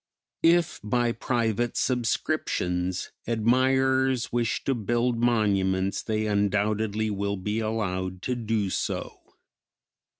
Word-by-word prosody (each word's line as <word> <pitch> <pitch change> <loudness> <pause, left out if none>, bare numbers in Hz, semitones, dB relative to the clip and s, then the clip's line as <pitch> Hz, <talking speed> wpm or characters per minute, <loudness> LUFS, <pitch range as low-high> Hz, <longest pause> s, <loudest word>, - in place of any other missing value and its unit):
If 170 0 +3
by 120 +2 +1
private 120 -1 -1
subscriptions 90 -7 -1 0.2
admirers 130 +2 +2
wish 120 -2 0
to 135 - +1
build 120 +1 0
monuments 100 -5 +1
they 110 -1 -1
undoubtedly 105 +1 0
will 100 0 -2
be 105 +4 -2
allowed 95 -4 -2
to 125 - -1
do 110 -5 -1
so. - - -4
110 Hz, 100 wpm, -26 LUFS, 100-120 Hz, 0.2 s, If